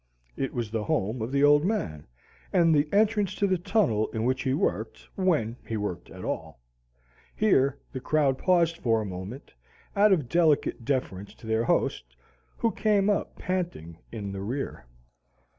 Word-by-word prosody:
It 135 - -2
was 115 -3 -3
the 110 -2 -2
home 110 +4 -1
of 115 +3 -3
the 140 0 +2
Old 145 0 +6
Man, 85 - -2 0.4
and 165 -2 +4
the 150 0 +2
entrance 205 -2 +2
to 205 - +1
the 185 -2 +1
tunnel 140 - +1
in 110 - -3
which 130 +2 +1
he 130 0 0
worked 110 0 -2
when 155 - 0
he 110 - -4
worked 105 -4 -4
at - - -9
all. 80 -5 -4 0.8
Here 140 -11 +3
the 130 - -5
crowd 140 -1 +1
paused 170 -2 +2
for 115 -2 +2
a 110 - -3
moment, 95 +7 -7 0.4
out 205 +1 +5
of 155 -10 +2
delicate 155 -5 +2
deference 100 -8 -2
to - - -15
their 110 +1 +1
host, - - 0 0.4
who 230 - +1
came 205 -1 +2
up 200 - -2
panting 170 - -4
in 105 -3 -5
the 95 0 -5
rear. 125 - -4
130 Hz, 170 wpm, -27 LUFS, 110-175 Hz, 0.8 s, Old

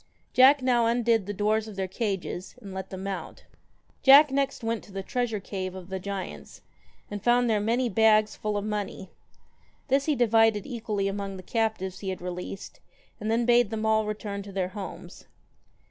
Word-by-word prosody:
Jack 265 +1 +6
now 240 -2 +3
undid 230 -3 +2
the - - -2
doors 215 +2 0
of 215 - -9
their 190 -1 -2
cages 190 -3 -4
and 195 -2 -10
let 190 0 -6
them 190 0 -7
out 195 -1 -6 0.6
Jack 280 +1 +8
next 275 -2 -1
went 225 0 -1
into 200 - -16
the 195 0 -5
treasure 240 -1 -2
cave 185 -1 -5
of 185 -1 -9
the 190 0 -3
giants 195 0 -7 0.5
and 205 -1 -5
found 245 0 +4
there 220 -2 +2
many 235 +4 +1
bags 215 0 +4
full 210 -1 -2
of 205 - -3
money. 205 -3 -4 0.8
This 275 +1 +2
he 305 - +1
divided 225 -3 +3
equally 215 -6 -2
among 195 -1 -4
the 185 - -10
cap 220 +1 0
tives 190 0 -6
he 195 - -4
had 185 - -4
released, 180 +2 -7 0.4
and 215 - -3
then 230 +1 +2
bade 240 -2 +4
them 220 0 -3
all 220 -1 +2
return 205 -1 -4
to 200 0 -10
their 185 -2 -2
homes. 195 0 -9
215 Hz, 190 wpm, -27 LUFS, 195-230 Hz, 0.8 s, Jack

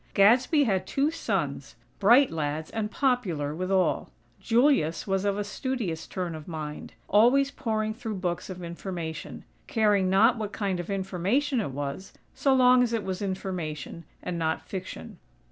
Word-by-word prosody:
Gadsby 245 - +5
had 195 -7 0
two 285 +3 +1
sons; 330 - -3 0.2
bright 240 +7 +6
lads 155 0 -3
and 220 -1 -2
popular 200 - 0
with 185 +3 -3
all. 190 -1 +1 0.3
Julius 235 - +2
was 195 0 0
of 200 0 +1
a 205 - -1
studious 205 - -3
turn 180 -3 -4
of 155 -1 -9
mind, 155 -3 -6
always 250 +7 +4
poring 220 -5 -2
through 225 -2 -5
books 180 -2 -3
of 185 -1 -7
information; 170 -2 -6 0.2
caring 205 -4 +2
not 225 +5 +4
what 210 -1 -4
kind 195 -4 -1
of 175 - -5
information 200 +8 0
it 195 - -3
was, 140 +7 -5 0.2
so 275 - +1
long 255 -1 +6
as 240 -2 +1
it 225 -3 0
was 190 0 -4
information, 180 -5 -4 0.2
and 175 -1 -3
not 160 -1 -1
fiction. 185 - -7
195 Hz, 160 wpm, -27 LUFS, 170-235 Hz, 0.3 s, bright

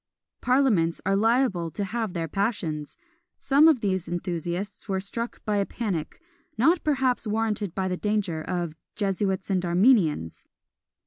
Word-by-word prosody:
Parliaments 240 -11 +2
are 195 +1 +2
liable 220 -5 +2
to 205 - -4
have 220 0 -3
their 165 -2 -2
passions! 165 -6 -2 0.4
Some 285 +3 +5
of 300 -7 +4
these 190 -3 -1
enthusiasts 175 +3 -4
were 190 -1 0
struck 230 +5 -5
by 210 -1 +1
a 200 - +1
panic, 195 -10 -4 0.4
not 325 +9 +3
perhaps 265 -5 +1
warranted 210 -3 -1
by 190 -1 -1
the 180 -1 -2
danger, 205 -6 -1
of 175 -1 -3 0.2
"Jesuits 195 -1 -1
and 185 -1 +1
Armenians." 175 - +2
195 Hz, 140 wpm, -26 LUFS, 175-225 Hz, 0.4 s, Some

